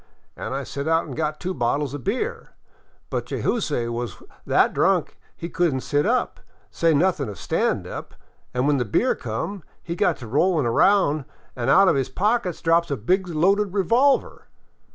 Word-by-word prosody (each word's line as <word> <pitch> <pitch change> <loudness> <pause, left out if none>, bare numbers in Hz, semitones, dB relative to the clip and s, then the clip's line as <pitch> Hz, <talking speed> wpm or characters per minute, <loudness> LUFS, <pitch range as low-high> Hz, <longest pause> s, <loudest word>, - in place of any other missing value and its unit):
An' - - -6
I 135 +1 -2
sent 140 +3 -5
out 165 +1 +2
an' - - -9
got 155 -1 -2
two 185 +1 -3
bottles 140 +1 -1
of 145 - -6
beer. 425 - -3 0.6
But - - -2
Jayzoose 150 - -1
was 120 0 -4 0.3
that - - +3
drunk - - +1 0.2
he 170 - -6
could 175 -5 0
n't 130 - -3
sit 145 +5 +1
up, 250 +2 0 0.3
say 165 -1 +2
nothin' 150 - +1
of 100 - -8
stand - - -1
up, - - -8 0.4
an' 125 +1 0
when 145 -1 +3
the 125 - +1
beer 120 - +1
come 135 - -5 0.2
he 170 - -4
got - - +1
to 120 - -9
roUin' 150 - +2
around 150 - +3 0.3
an' 125 0 -2
out 195 +7 +6
of - - +4
his 135 -1 -1
pocket 200 - 0
drops 170 +1 +3
a 140 - -1
big 185 - 0
loaded 190 +4 +1
revolver. 240 +8 +2
160 Hz, 180 wpm, -23 LUFS, 135-190 Hz, 0.6 s, out